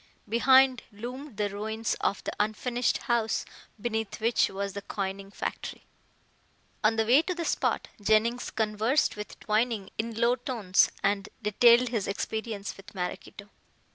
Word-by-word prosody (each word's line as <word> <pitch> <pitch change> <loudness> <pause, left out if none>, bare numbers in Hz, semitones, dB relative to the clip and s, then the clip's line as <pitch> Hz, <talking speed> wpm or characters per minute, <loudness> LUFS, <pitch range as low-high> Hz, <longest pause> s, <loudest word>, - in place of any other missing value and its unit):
Behind 260 +3 +5
loomed 245 +4 -8
the 210 -1 +1
ruins 220 +2 -2
of 200 - 0
the - - -3
unfinished 235 +3 0
house 235 -2 0 0.3
beneath 220 -1 -3
which 230 +2 +2
was 200 0 -4
the 200 - -5
coining 195 0 -4
factory. - - -5 1.0
On 215 +1 +4
the 225 0 +1
way 255 +7 +6
to 365 +2 -3
the 340 -1 -3
spot - - 0
Jennings 220 +4 +2
conversed 220 +6 +1
with 210 0 -8
Twining 215 -2 0
in 230 +1 -2
low 235 +2 +2
tones 230 -7 +2
and 200 0 +1
detailed 235 +4 +5
his 225 -5 -1
experience 215 0 -3
with 195 +1 -14
Maraquito. 190 +2 -5
220 Hz, 140 wpm, -28 LUFS, 205-240 Hz, 1.0 s, way